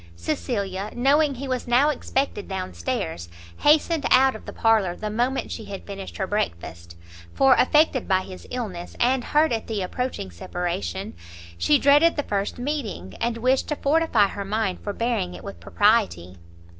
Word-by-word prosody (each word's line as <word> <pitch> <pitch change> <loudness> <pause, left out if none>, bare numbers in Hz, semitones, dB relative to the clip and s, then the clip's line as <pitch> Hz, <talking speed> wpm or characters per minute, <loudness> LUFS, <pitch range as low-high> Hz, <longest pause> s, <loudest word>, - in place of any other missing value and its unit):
Cecilia, 190 - -3
knowing 280 +3 +3
he 275 +2 -6
was 255 -2 -3
now 250 +5 +4
expected 270 -6 -2
down 190 - -4
stairs, 85 0 -4 0.3
hastened 310 +1 +3
out 265 0 +5
of 220 - -11
the - - -5
parlour 215 -6 +2
the 215 +2 -5
moment 245 +5 -1
she 220 - -6
had 195 -1 -8
finished 195 -1 -8
her 190 - -1
breakfast; 85 - -4 0.4
for 270 -1 +6
affected 290 0 +3
by 190 -1 +3
his 185 -1 -10
illness, 200 -9 -5
and 250 +1 +2
hurt 305 +4 +2
at 225 -2 -2
the 215 -4 -2
approaching 215 - -4
separation, 170 - -4 0.4
she 295 - +3
dreaded 290 +4 +5
the 290 - -1
first 200 -3 -2
meeting, 245 - -4
and 235 0 0
wished 255 +3 +1
to 300 - -1
fortify 285 -7 +3
her 200 - -5
mind 200 -1 -1
for 205 - -3
bearing 210 -5 -2
it - - -11
with 200 - -8
propriety. 205 - +1
220 Hz, 170 wpm, -24 LUFS, 185-265 Hz, 0.4 s, for